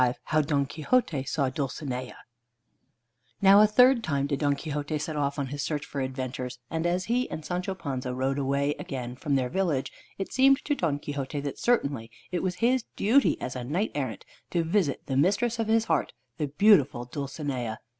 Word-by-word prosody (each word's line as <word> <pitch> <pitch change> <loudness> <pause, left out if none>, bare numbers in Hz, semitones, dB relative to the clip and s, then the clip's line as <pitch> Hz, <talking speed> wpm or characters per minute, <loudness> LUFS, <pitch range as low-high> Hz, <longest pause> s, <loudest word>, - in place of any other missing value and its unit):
V 125 -1 +3
HOW 155 +1 +2
DON 140 -2 +1
QUIXOTE 150 - 0
SAW 140 -4 0
DULCINEA 130 -2 -4 1.2
Now 200 +1 +7
a 215 - +7
third 250 +3 +5
time 140 -5 0
did 140 -1 -1
Don 145 -2 +2
Quixote 150 0 -3
set 155 +1 -4
off 140 -1 -1
on 140 - -1
his 145 +1 -4
search 145 0 -2
for 140 - -4
adventures, 130 -1 -4
and 160 +1 0
as 180 +2 0
he 250 +2 0
and 155 - -6
Sancho 180 +2 -2
Panza 130 -7 -4
rode 135 +2 -1 0.4
again 130 -3 -4
away - - -9
from 145 -3 0
their 130 -2 +1
village, 170 -7 0 0.3
it 195 - -5
seemed 270 +1 +4
to 295 - +1
Don 165 - 0
Quixote 145 -1 -4
that 140 -1 -5
certainly 140 - +1 0.2
it 180 - -1
was 185 -2 -1
his 245 +3 +2
duty 250 +7 +3
as 125 - -5
a 125 - -4
knight 170 - -1
errant 130 -6 -4 0.2
to 170 -2 +1
visit 165 -4 0
the 135 - -2
Mistress 210 - +2
of 225 - 0
his 225 0 +3
Heart, - - 0 0.3
the 150 - 0
beautiful 145 - +4
Dulcinea. 135 -4 -4
145 Hz, 190 wpm, -27 LUFS, 135-190 Hz, 1.2 s, Now